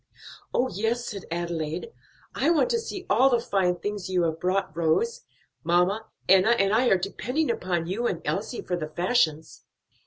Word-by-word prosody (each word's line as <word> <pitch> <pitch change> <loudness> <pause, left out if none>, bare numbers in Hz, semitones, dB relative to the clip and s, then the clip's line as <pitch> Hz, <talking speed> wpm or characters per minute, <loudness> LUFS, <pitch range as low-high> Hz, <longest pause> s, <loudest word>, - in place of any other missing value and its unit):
"Oh, 255 - +1
yes!" 225 +3 -1
said 200 -4 -6
Adelaide, 170 -1 -3 0.4
"I 275 +6 +1
want 340 +9 +3
to 470 - +2
see 390 -4 -6
all 260 +4 +4
the 240 -2 +3
fine 190 -5 +1
things 200 +1 -5
you 180 -2 +1
have 160 -1 -1
brought, 185 -2 -1
Rose. 460 - +1 0.4
Mamma, 180 +6 +1 0.2
Enna, 195 +5 +5
and 195 -1 +2
I 245 +3 +3
are 195 - +5
depending 245 - -1
upon 175 -6 -2
you 210 +8 -1
and 170 - -3
Elsie 220 +5 -3
for 180 - -2
the 160 -3 -4
fashions." 160 -3 0
195 Hz, 175 wpm, -26 LUFS, 175-240 Hz, 0.4 s, Enna